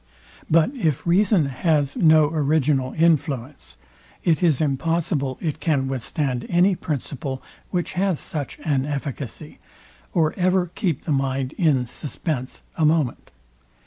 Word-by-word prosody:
But 165 +7 +4
if 165 - -1
reason 185 -1 +3
has 140 +1 0
no 155 -2 +5
original 145 -4 +1
influence, 150 -5 0 0.5
it 160 -4 +2
is 165 -6 +3
impossible 150 -2 0
it 155 -4 -2
can 140 -5 +1
withstand 130 0 -2
any 180 +3 +4
principle, 140 -4 -4 0.3
which 175 -2 -2
has 185 -3 0
such 145 -3 -4
an 140 -4 0
efficacy, 140 -4 -5 0.5
or 160 -3 +2
ever 180 -1 +1
keep 170 -9 -1
the 160 - -3
mind 135 0 0
in 145 -8 +2
suspence 140 0 -5
a 160 - 0
moment. 155 -4 +1
150 Hz, 125 wpm, -23 LUFS, 135-165 Hz, 0.5 s, no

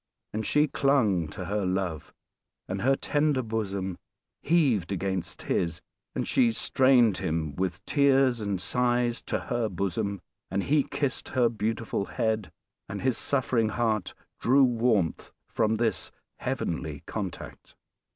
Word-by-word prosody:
And 110 +1 -2
she 150 +1 +3
clung 115 - +2
to 90 +4 -7
her 105 +2 -1
love; 90 -4 -2 0.6
and 95 +1 -3
her 135 +4 +4
tender 145 -2 +1
bosom 100 -5 -3 0.4
heaved 135 - +2
against 95 -1 -3
his; 85 -1 -1 0.4
and - - -1
she 120 -2 +4
strained 125 -4 +4
him, 80 -3 -2
with 90 -1 -2
tears 135 -4 +3
and 100 -3 -1
sighs, 120 +3 +1
to - - -2
her 120 -3 -1
bosom; 100 +2 -2 0.3
and 95 +2 -1
he 150 +1 +3
kissed 140 0 -2
her 125 -3 +3
beautiful 110 -2 -2
head; 110 -6 -1 0.4
and 100 - -5
his 130 -2 +2
suffering 125 -5 +1
heart 110 -3 -1 0.2
drew 135 +3 +5
warmth 115 -8 +1 0.2
from 110 -1 +1
this 110 -4 0 0.3
heavenly - - -3
contact. - - -6
110 Hz, 130 wpm, -28 LUFS, 95-125 Hz, 0.6 s, drew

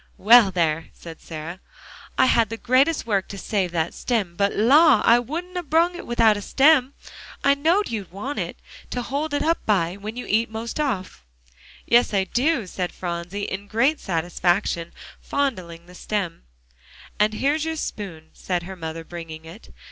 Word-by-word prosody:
"Well, 225 0 +7
there," 165 -3 0
said 165 -1 -11
Sarah, 165 +3 -7 0.6
"I - - +5
had 230 -4 +3
the 225 - -5
greatest 260 +6 +2
work 200 -4 0
to 200 - -8
save 195 -1 -1
that 165 -1 -1
stem. 205 -8 -2
But, 200 +2 +1
la! 275 +3 +5
I 235 +1 +6
wouldn't 335 +9 -6
'a' 360 - -1
brung 330 +3 +2
one 350 - -9
without 230 -2 +4
a 205 - -5
stem. 275 +3 +3 0.5
I 280 - +5
know'd 330 +7 +1
you'd 205 -6 -5
want 210 +10 -5
it - - -4 0.3
to 245 - -3
hold 290 +5 -3
it 290 - 0
up 330 +1 0
by, 185 -3 +1
when 210 +3 -7
you'd 250 - -5
eat 220 +3 +3
the 220 - -20
most 230 +6 -5
off." 195 - -3 0.6
"Yes, 235 -3 +3
I 195 - +3
do," 245 - 0
said 180 0 -4
Phronsie, 175 +3 -5
in 200 +1 -5
great 250 +9 +2
satisfaction 175 0 -1 0.3
fondling 185 -12 -3
the 180 - -15
stem. 185 - -4 0.7
"And 210 +1 +2
here's 290 +6 +1
your 320 0 -2
spoon," 180 - -6
said 180 -2 -3
her 190 +2 -8
mother, 165 -1 -6
bringing 165 -2 -9
it. 170 +7 -13
210 Hz, 180 wpm, -23 LUFS, 175-270 Hz, 0.7 s, Well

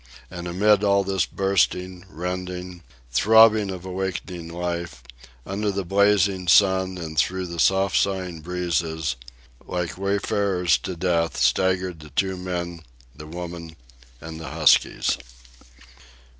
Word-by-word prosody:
And 90 -1 -6
amid 100 +3 +3
all 100 -1 +3
this 95 -2 0
bursting, 95 -1 0
rending, 90 0 -5 0.3
throbbing 110 - +5
of 95 -1 -6
awakening 90 -2 -4
life, 85 -6 -5 0.4
under 105 +2 -2
the 100 -1 -3
blazing 100 -1 +2
sun 95 0 +4
and 80 -3 -3
through 95 +4 0
the 85 -1 -7
soft 95 +3 +2
sighing 90 -4 -1
breezes, 80 -4 -2 0.5
like 90 0 -4
wayfarers 100 -5 +1
to 90 +8 -5
death, 85 -1 0
staggered 95 -2 +1
the 75 -1 -12
two 95 +7 -1
men, 90 -2 -5 0.3
the 75 +1 -10
woman, 85 -1 -7 0.4
and 80 +2 -8
the 80 - -7
huskies. - - +3
90 Hz, 120 wpm, -23 LUFS, 85-95 Hz, 0.5 s, throbbing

